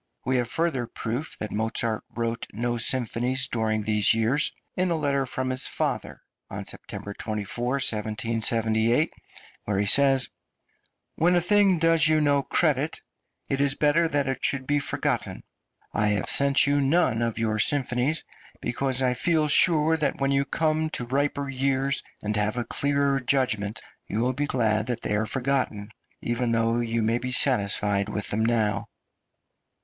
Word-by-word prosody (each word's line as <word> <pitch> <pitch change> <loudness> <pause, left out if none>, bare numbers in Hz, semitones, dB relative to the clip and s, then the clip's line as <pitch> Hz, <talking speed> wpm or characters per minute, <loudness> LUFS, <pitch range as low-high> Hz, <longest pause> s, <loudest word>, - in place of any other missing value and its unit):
We 130 0 +1
have 120 -1 -1
further 155 -8 -1
proof 120 +6 -5
that 110 - -5
Mozart 110 0 -1
wrote 115 -1 -3
no 120 +2 -2
symphonies 125 +2 0
during 110 -2 -1
these 105 0 +2
years 120 +6 +1 0.2
in 185 0 +1
a 170 - +1
letter 140 -3 0
from 130 +1 -2
his 130 0 -2
father, - - -3 0.3
on - - -6
September 100 - -8
24, 110 +3 -4
1778, 115 +1 0 0.5
where 100 -2 -1
he 100 - +1
says: 135 +4 +3 0.9
"When 175 +3 +3
a - - +5
thing 195 +1 +3
does 165 -1 +4
you 155 0 +3
no 145 -2 +3
credit, 150 0 0 0.5
it 135 0 0
is 140 -1 +3
better 150 +3 +3
that 145 -3 0
it 135 -1 -3
should 135 -2 +1
be 145 +2 +1
forgotten. 140 - -2 0.5
I 105 0 +1
have 105 -2 0
sent 140 0 +3
you 145 0 +2
none 135 -5 +2
of 115 -1 -1
your 110 -1 0
symphonies 135 +3 +2 0.4
because 130 +1 -1
I 125 -1 +2
feel 155 +3 +1
sure 160 +1 +4
that 150 -2 -1
when 135 0 +1
you 140 0 +3
have 140 - -5
come 155 0 0
to 120 - -5
riper 140 +2 -1
years, 135 0 0 0.2
and 105 +1 -1
have 105 +3 0
a 120 - 0
clearer 140 -1 +1
judgment, 115 -6 -1 0.3
you 110 - -2
will 125 +2 +1
be 145 +3 -2
glad 110 -4 0
that 120 -2 -3
they 105 - -1
are 110 +1 0
forgotten, 125 -5 -2 0.3
even 120 0 -1
though 115 +1 +1
you 115 -1 -1
may 115 +2 +1
be 125 +1 -4
satisfied 105 -5 +2
with 105 -1 -3
them 110 +2 0
now." 110 -3 0
125 Hz, 165 wpm, -26 LUFS, 110-140 Hz, 0.9 s, a